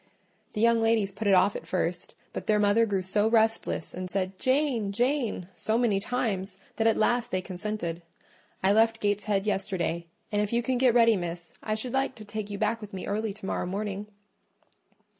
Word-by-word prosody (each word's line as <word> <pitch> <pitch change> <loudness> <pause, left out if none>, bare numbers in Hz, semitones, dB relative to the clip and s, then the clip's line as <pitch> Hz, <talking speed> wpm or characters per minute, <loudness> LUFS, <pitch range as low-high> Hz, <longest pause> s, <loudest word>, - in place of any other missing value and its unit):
The 210 - -2
young 230 0 +4
ladies 225 -3 +2
put 205 +2 -4
it 195 - +6
off 185 +2 +4
at - - -7
first; 175 -1 -2 0.2
but - - -6
their 215 - +4
mother 210 +2 +4
grew 195 -3 0
so 205 +3 +2
restless, 225 -6 +1
and 185 0 -5
said, 185 0 -2
'Jane, 260 -6 +1
Jane,' 240 -4 0
so 220 +4 0
many 230 -5 +2
times, 195 -4 -2 0.2
that 225 - +3
at 225 - +3
last 240 +2 +2
they 185 - 0
consented. 185 -2 -4 0.6
I 195 +1 +5
left 225 +1 +3
Gateshead 205 -1 0
yesterday: 185 -5 -1 0.2
and 205 0 +1
if 210 - -1
you 235 0 +1
can 255 +1 0
get 250 -2 +4
ready, 230 -2 +6
Miss, 175 -2 -5
I 215 - -1
should 235 +3 -1
like 270 0 0
to 215 - -11
take 210 0 -5
you 200 - -4
back 220 +2 0
with 210 -1 -9
me 190 - -5
early 215 +1 -1
to 195 -1 -9
morrow 185 - -2
morning." 200 +1 -3
210 Hz, 195 wpm, -28 LUFS, 195-225 Hz, 0.6 s, it